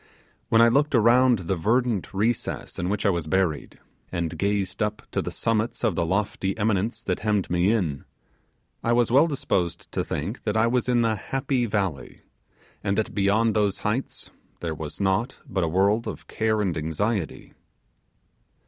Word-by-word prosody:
When 115 0 +6
I - - +7
looked 140 +4 +2
around 120 +2 +5
the 95 - +1
verdant 115 +3 0
recess 110 +4 -2
in 90 +1 -1
which 105 +1 -1
I 100 - +5
was 85 -4 -2
buried, 90 -3 0 0.3
and 85 -3 -2
gazed 100 0 -1
up 105 0 -1
to - - 0
the - - -4
summits 115 +1 -1
of 110 -5 +2
the 85 0 -1
lofty 95 +1 -1
eminence 110 +1 0
that 90 - -1
hemmed 105 -3 0
me 90 +3 +3
in, 85 - -1 0.8
I 115 - +2
was 120 -1 +2
well 140 +6 +6
disposed 95 - -2
to - - -1
think 95 +11 -4
that 105 0 0
I 110 - +4
was 125 +1 +1
in 120 -1 +3
the 115 -1 +2
'Happy 130 +4 -1
Valley', 95 - -3 0.6
and 100 -1 0
that 110 - -1
beyond 105 +3 +2
those 105 -2 +2
heights 110 +6 -2 0.3
there 85 -2 -3
was 75 -1 -7
naught 100 +6 +1
but 95 -1 -1
a - - +1
world 100 +6 +2
of - - -6
care 110 -1 0
and 95 -5 0
anxiety. 85 +5 -2
105 Hz, 175 wpm, -25 LUFS, 95-115 Hz, 0.8 s, I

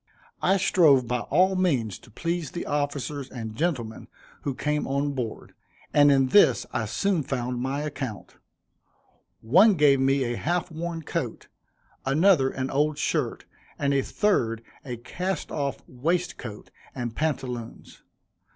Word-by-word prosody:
I 195 - +3
strove 155 -9 +4
by 125 +1 0
all 185 +9 +2
means 135 - 0
to - - -18
please 165 +5 -3
the 175 - -5
officers 145 -1 -2
and 110 -3 -6
gentlemen 125 -7 -2 0.3
who 140 -3 -3
came 150 +2 -1
on 140 +1 0
board, 120 -5 -5 0.4
and 145 -1 +6
in 135 -2 +3
this 205 - +5
I 115 - 0
soon 175 - 0
found 125 -2 -3
my 135 +3 -2
account. 135 -8 -6 1.0
One 185 - +6
gave 145 -4 +5
me 135 +1 +2
a 120 -1 -2
half 175 +2 -1
worn 165 +1 -4
coat, - - -4 0.5
another 145 0 +4
an 130 0 -3
old 150 +2 +1
shirt, - - -1 0.3
and 140 -1 +1
a 140 - +3
third, 115 - 0 0.2
a 125 -3 -5
cast 180 +9 -4
off 140 -3 -3
waistcoat 135 -5 -3 0.2
and 120 -3 -4
pantaloons. 125 -6 -4
140 Hz, 140 wpm, -26 LUFS, 125-165 Hz, 1.0 s, and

